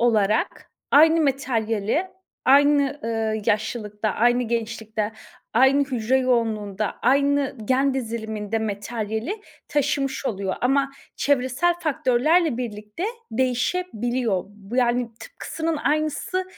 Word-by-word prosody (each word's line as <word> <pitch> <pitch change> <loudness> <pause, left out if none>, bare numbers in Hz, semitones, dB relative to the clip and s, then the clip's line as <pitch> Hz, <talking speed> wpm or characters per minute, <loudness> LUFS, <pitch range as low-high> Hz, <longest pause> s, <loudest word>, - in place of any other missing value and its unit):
olarak 215 -3 +1 0.2
aynı 320 +3 +6
materyali 245 - 0 0.4
aynı, 285 +1 +4
ııı, 220 -1 -1
yaşlılıkta, 215 0 -1
aynı 240 +4 +2
gençlikte, 220 -2 -3 0.4
aynı 265 +4 +5
hücre 255 -2 0
yoğunluğunda, 220 -5 0
aynı 280 +1 +2
gen 265 +4 +2
diziliminde 220 -3 -3
materyali 220 - -3 0.3
taşımış 280 -2 0
oluyor 195 -3 -2
ama 275 +2 +2 0.3
çevresel 280 +5 +2
faktörlerle 305 0 +2
birlikte 215 - -5 0.3
değişebiliyor. 245 - 0
Bu 205 +3 -9
yani, 245 -1 +2
tıpkısının 325 -1 -4
aynısı 310 +5 -1
245 Hz, 95 wpm, -23 LUFS, 220-280 Hz, 0.4 s, aynı